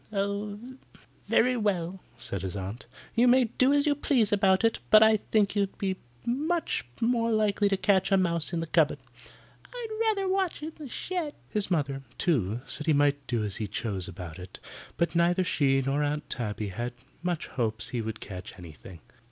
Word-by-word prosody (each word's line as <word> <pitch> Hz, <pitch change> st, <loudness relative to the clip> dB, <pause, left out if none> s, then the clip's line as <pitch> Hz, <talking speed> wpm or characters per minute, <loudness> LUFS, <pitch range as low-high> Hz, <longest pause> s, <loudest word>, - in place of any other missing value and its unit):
"Very 250 Hz, +2 st, +3 dB
well," 190 Hz, -4 st, -1 dB, 0.2 s
said 100 Hz, -, -4 dB
his 95 Hz, 0 st, -4 dB
aunt. 100 Hz, +7 st, -6 dB, 0.3 s
"You 240 Hz, +2 st, +4 dB
may 255 Hz, +1 st, +6 dB
do 255 Hz, +3 st, +2 dB
as 285 Hz, 0 st, +3 dB
you 295 Hz, -, +4 dB
please 260 Hz, -7 st, +2 dB
about 195 Hz, 0 st, +3 dB
it, 225 Hz, -, +2 dB
but 215 Hz, 0 st, +8 dB
I 220 Hz, 0 st, +6 dB
think 210 Hz, -1 st, +1 dB
you'd 200 Hz, -1 st, 0 dB
be 190 Hz, -2 st, -1 dB, 0.3 s
much 300 Hz, -, -1 dB
more 230 Hz, 0 st, +1 dB
likely 210 Hz, -2 st, +2 dB
to 195 Hz, -, +1 dB
catch 190 Hz, -1 st, +2 dB
a 195 Hz, -, +6 dB
mouse 170 Hz, -3 st, +1 dB
in 170 Hz, -2 st, -1 dB
the -, -, -2 dB
cupboard." 160 Hz, -3 st, +2 dB, 0.7 s
"I'd 455 Hz, -3 st, -6 dB
rather 395 Hz, -3 st, +1 dB
watch 375 Hz, -4 st, 0 dB
in 315 Hz, -, -4 dB
the 300 Hz, -4 st, -9 dB
shed." 340 Hz, +1 st, -3 dB
His 210 Hz, -3 st, -1 dB
mother, 140 Hz, -6 st, 0 dB, 0.2 s
too, 120 Hz, -, 0 dB
said 150 Hz, +1 st, -3 dB
he 155 Hz, -, +5 dB
might 145 Hz, -1 st, +2 dB
do 120 Hz, -3 st, 0 dB
as 100 Hz, -2 st, -3 dB
he 110 Hz, -, -3 dB
chose 100 Hz, -3 st, -3 dB
about 90 Hz, -2 st, -8 dB
it, 90 Hz, 0 st, -10 dB, 0.4 s
but 170 Hz, -, +1 dB
neither 175 Hz, +2 st, +3 dB
she 135 Hz, -6 st, +2 dB
nor 135 Hz, +2 st, 0 dB
Aunt 150 Hz, 0 st, -1 dB
Tabby 105 Hz, -3 st, -3 dB
had 120 Hz, +5 st, -4 dB, 0.3 s
much 175 Hz, -2 st, -2 dB
hopes 110 Hz, -3 st, -2 dB
he 120 Hz, -2 st, -2 dB
would 110 Hz, 0 st, -5 dB
catch 95 Hz, -1 st, -8 dB
anything. 85 Hz, 0 st, -12 dB
175 Hz, 185 wpm, -28 LUFS, -, 0.7 s, but